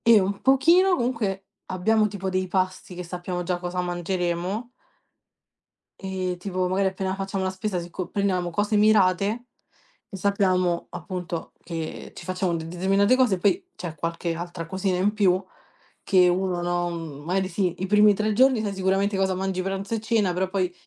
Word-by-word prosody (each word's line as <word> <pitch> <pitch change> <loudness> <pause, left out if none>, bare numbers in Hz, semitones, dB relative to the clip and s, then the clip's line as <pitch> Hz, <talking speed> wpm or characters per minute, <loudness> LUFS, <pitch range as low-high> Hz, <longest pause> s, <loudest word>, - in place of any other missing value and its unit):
E 230 -2 +6
un 195 +1 -1
pochino, 340 +8 +5
comunque, 215 -7 -2 0.2
abbiamo 215 +4 +2
tipo 195 -2 -4
dei 185 0 0
pasti, 185 -1 -1
che 180 - -6
sappiamo 180 +1 -4
già 175 0 -1
cosa 180 0 -3
mangeremo. 180 +4 -2 1.3
E 185 -1 -3
tipo 185 0 -2
magari 190 +1 +1
appena 190 0 -3
facciamo 195 0 -3
la 185 - 0
spesa 190 0 -3
se 170 0 -7
co 180 +1 -5
prendiamo 185 -3 0
cose 205 +4 0
mirate, 210 +2 +3 0.6
e 195 - -7
sappiamo 185 -3 +1
appunto 175 -1 -5
che 165 -2 -6
ci 175 - -9
facciamo 185 -1 -1
determinate 190 +7 +2
cose. 250 -7 +3
Poi 275 - +2
c'è 175 -3 -6
qualche 165 +1 -3
altra 170 0 -6
cosina 190 +1 -1
in 205 +3 +2
più, 185 -3 +3 0.6
che 185 -2 +5
uno, 180 0 0
no, 175 0 0 0.3
magari 185 +3 0
sì, 180 -1 0
i - - 0
primi 210 +1 +5
3 215 +2 0
giorni 255 0 +4
sai 205 -2 -2
sicuramente 195 +1 +1
cosa 190 -1 +1
mangi 190 0 -2
pranzo 195 +3 -3
e 225 - -1
cena, 220 -4 +1
però 185 +1 -1
poi 185 -2 -1
190 Hz, 165 wpm, -25 LUFS, 180-200 Hz, 1.3 s, E